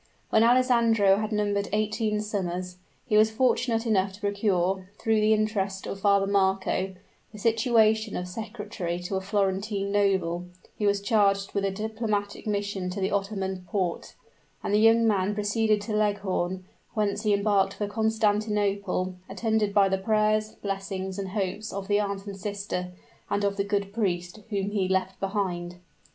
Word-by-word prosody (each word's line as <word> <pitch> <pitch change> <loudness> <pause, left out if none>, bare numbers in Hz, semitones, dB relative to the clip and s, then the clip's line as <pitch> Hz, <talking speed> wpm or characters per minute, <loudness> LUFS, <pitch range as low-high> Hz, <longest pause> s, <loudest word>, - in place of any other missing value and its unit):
When 220 - +5
Alessandro 230 -5 +4
had 215 +1 -2
numbered 205 -1 0
eighteen 215 0 0
summers, 180 -3 -3 0.3
he 210 -3 +2
was 215 +1 +6
fortunate 235 0 +1
enough 195 -3 +1
to 195 - -12
procure, 195 -2 0
through 220 -1 +1
the 215 +1 +3
interest 205 -3 0
of 195 - -5
Father 200 0 +3
Marco, 190 -1 +1 0.4
the 215 - -11
situation 220 -1 +2
of 180 - -4
secretary 205 -4 -5
to 180 +2 -4
a 190 - -1
Florentine 200 0 -1
noble, 190 -4 +1 0.3
who 210 - +2
was 200 0 +2
charged 200 -2 +2
with 200 - 0
a - - +2
diplomatic 215 0 -3
mission 200 -3 -2
to 185 +2 -4
the 190 +1 0
Ottoman 195 -2 -2
Porte; 180 -3 -2 0.5
and - - -1
the 210 - +5
young 225 +1 +5
man 205 -2 +1
proceeded 210 0 +1
to 210 +1 -3
Leghorn, 195 -3 -1 0.3
whence 205 -1 0
he 215 -1 +1
embarked 200 -1 +2
for 210 - -2
Constantinople, 205 -3 0
attended 215 +1 0
by 200 -1 +4
the 190 0 0
prayers, 215 +1 +1
blessings, 195 -1 -3
and 195 -1 -4
hopes 200 +2 -3
of 195 0 -5
the 205 0 +3
aunt 200 -1 -3
and 200 -1 -7
sister, 200 -2 -3 0.4
and 200 0 0
of 200 0 +1
the 200 - 0
good 200 -1 -2
priest, 180 -3 -2
whom 200 -1 -1
he 200 -3 0
left 190 0 -1
behind. 185 -3 -2
200 Hz, 160 wpm, -27 LUFS, 190-215 Hz, 0.5 s, was